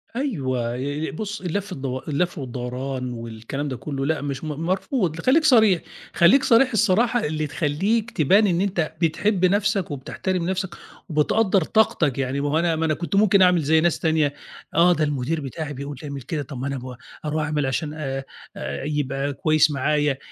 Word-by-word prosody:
أيوه 130 - -2
ي 145 +4 -3
ي - - -5
بُصّ، 210 +5 -5
اللف 190 +3 -3
الدو 130 -4 -4
اللف 175 +4 -1
والدوران 125 0 -4
والكلام 115 +5 -5
ده 130 -3 -4
كلّه، 135 -2 -4
لأ 155 0 0
مش 140 0 -4
م - - -4
مرفوض 165 - -1
خليك 305 +5 +4
صريح 220 - +5 0.3
خليك 250 +11 +5
صريح 255 +2 +4
الصراحة 225 +3 +2
اللي 155 0 -2
تخليك 190 - 0
تبان 195 +8 +4
إن 175 -1 +1
أنت 175 -6 -1
بتحب 185 +4 +2
نفسك، 200 -1 +1
وبتحترم 170 +6 -3
نفسك 190 -2 -3 0.3
وبتقدَّر 185 +6 +2
طاقتك 165 - +2
يعني 135 +1 -1
ما 145 - -1
هو 155 +3 +2
أنا 170 -1 +1
ما 160 +1 0
أنا 155 - +2
كنت 170 +5 -3
ممكن 200 -1 +5
أعمل 180 -2 +5
زي 160 +2 +3
ناس 170 0 +1
تانية، 155 -3 +1 0.4
آه، 175 +1 +6
ده 155 - 0
المدير 145 +2 -1
بتاعي 145 +2 -5
بيقول 140 +1 -6
لي 150 - -5
اعمل 140 -1 -6
كده 145 +4 -3
طَب 140 -1 -9
ما 135 - -3
أنا 140 - -2
أب 125 -1 -7 0.3
أرُوح 155 +1 -1
أعمل 150 -2 -1
عشان 150 +3 -2
آآ، 135 -3 -4 0.3
آآ، 70 - -5
يبقى 140 -1 -2
كويس 155 +2 +3
معايا 145 0 +1
155 Hz, 185 wpm, -23 LUFS, 140-185 Hz, 0.4 s, آه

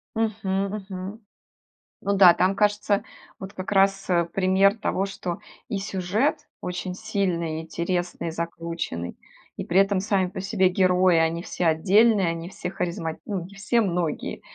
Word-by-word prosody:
Мгм, 205 -3 0 0.2
мгм. 190 +3 -6 0.8
Ну 200 - 0
да, 185 -3 +8
там 190 +2 +2
кажется, 205 0 +1 0.4
вот 190 +1 -8
как 185 +2 -6
раз, 195 0 +2
э, 170 -1 +3
пример 195 +4 +3
того, 195 -2 -1
что 185 -3 -5 0.3
и 210 - -2
сюжет 205 +11 -1
очень 180 +1 -4
сильный, 180 -7 -1
интересный, 170 0 -3
закрученный. 165 - -4 0.4
И - - -4
при 185 +3 +3
этом 195 -1 +3
сами 195 -2 +1
по 185 - -7
себе 195 -2 +2
герои: 180 -1 +3
они 165 +1 +1
все 175 - -3
отдельные, 195 +5 +4
они 165 +1 -3
все 180 - -5
харизма 170 -3 -3
ну, 195 -5 -3
не 200 +2 -13
все, 230 +4 +1
многие, 175 -5 -2
185 Hz, 150 wpm, -25 LUFS, 170-200 Hz, 0.8 s, да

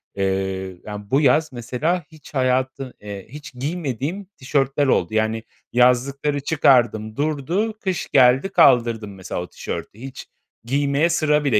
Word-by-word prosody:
eee, 95 -1 -2
yani, 105 -1 -8
bu 140 +3 +4
yaz 155 +3 +3
mesela 130 +9 -1
hiç 155 -1 -15
hayatı 130 0 0
eee, 100 -2 -7
hiç 145 +2 -10
giymediğim 150 - -3
tişörtler 135 +1 0
oldu. 90 -6 +1
Yani, 110 +1 0 0.3
yazlıkları 135 +4 +2
çıkardım, 120 -7 +2
durdu, 155 - -1
kış 190 -4 -3
geldi, 130 +6 +5
kaldırdım, 115 - +3
mesela, 95 -2 -5
o 90 - -6
tişörtü. 105 - -6
Hiç 130 +1 -9 0.4
giymeye 140 +5 +1
sıra 150 -3 +2
bile 125 -7 +3
130 Hz, 135 wpm, -22 LUFS, 110-150 Hz, 0.4 s, geldi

